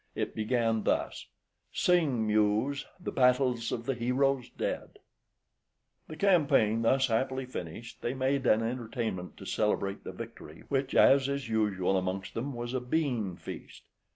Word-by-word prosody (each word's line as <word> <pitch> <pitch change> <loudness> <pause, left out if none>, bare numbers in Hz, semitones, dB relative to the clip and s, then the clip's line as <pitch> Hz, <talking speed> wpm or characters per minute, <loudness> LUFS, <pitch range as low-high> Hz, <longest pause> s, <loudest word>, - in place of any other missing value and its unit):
It - - -2
began 115 0 +1
thus - - -1 0.4
"Sing, 155 -11 +2
Muse, 110 +6 +1
the 180 - -4
battles 125 -2 +2
of 115 - -3
the 135 - 0
heroes 125 +2 0
dead - - -4 0.5
" - - -50
The 155 - -8
campaign 145 - +3
thus 130 +4 +3
happily 130 +2 0
finished, 115 -1 -8
they 120 - -2
made 135 0 0
an 110 +1 +4
entertainment 115 -5 -3
to - - -10
celebrate 100 -2 -1
the - - -6
victory, 75 +2 -10
which, 135 -1 -1
as 135 0 +6
is 140 -4 -3
usual 100 -4 +1
amongst 95 +1 -4
them, 130 +3 -4
was 120 +1 -4
a 130 - -1
bean 125 - -1
feast. - - -9
120 Hz, 150 wpm, -30 LUFS, 110-135 Hz, 0.5 s, as